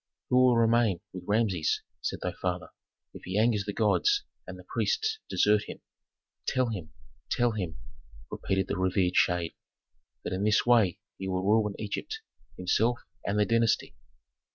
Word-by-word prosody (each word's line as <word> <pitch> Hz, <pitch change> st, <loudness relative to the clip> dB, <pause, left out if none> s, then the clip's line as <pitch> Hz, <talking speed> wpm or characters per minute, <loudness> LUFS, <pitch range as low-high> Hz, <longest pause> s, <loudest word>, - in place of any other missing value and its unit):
"'Who 125 Hz, -, +5 dB
will 125 Hz, -1 st, +5 dB
remain 115 Hz, -5 st, +3 dB
with 90 Hz, -1 st, -8 dB
Rameses,' 100 Hz, -7 st, +1 dB, 0.2 s
said -, -, -3 dB
thy -, -, -1 dB
father, -, -, -3 dB, 0.4 s
'if -, -, -10 dB
he 95 Hz, +2 st, -2 dB
angers 110 Hz, -2 st, +2 dB
the 105 Hz, -, -2 dB
gods 405 Hz, -, +2 dB, 0.2 s
and -, -, -7 dB
the -, -, -12 dB
priests 440 Hz, -1 st, -1 dB
desert 105 Hz, 0 st, +3 dB
him? -, -, -8 dB, 0.7 s
Tell 130 Hz, -2 st, +1 dB
him 90 Hz, -8 st, -5 dB, 0.4 s
tell 120 Hz, -1 st, +2 dB
him,' 90 Hz, -7 st, -4 dB, 0.5 s
repeated 95 Hz, -1 st, -1 dB
the -, -, -2 dB
revered 95 Hz, -1 st, +1 dB
shade, 90 Hz, -2 st, +2 dB, 0.7 s
'that -, -, -3 dB
in 95 Hz, +2 st, -2 dB
this 105 Hz, 0 st, +3 dB
way 115 Hz, -7 st, +4 dB, 0.2 s
he 95 Hz, -, -4 dB
will 95 Hz, 0 st, -1 dB
ruin 105 Hz, -1 st, +2 dB
Egypt, 100 Hz, -2 st, -4 dB, 0.4 s
himself, 110 Hz, +6 st, +1 dB, 0.3 s
and 100 Hz, +1 st, 0 dB
the 105 Hz, -, +4 dB
dynasty.'" 115 Hz, 0 st, +1 dB
105 Hz, 155 wpm, -29 LUFS, 95-115 Hz, 0.7 s, Who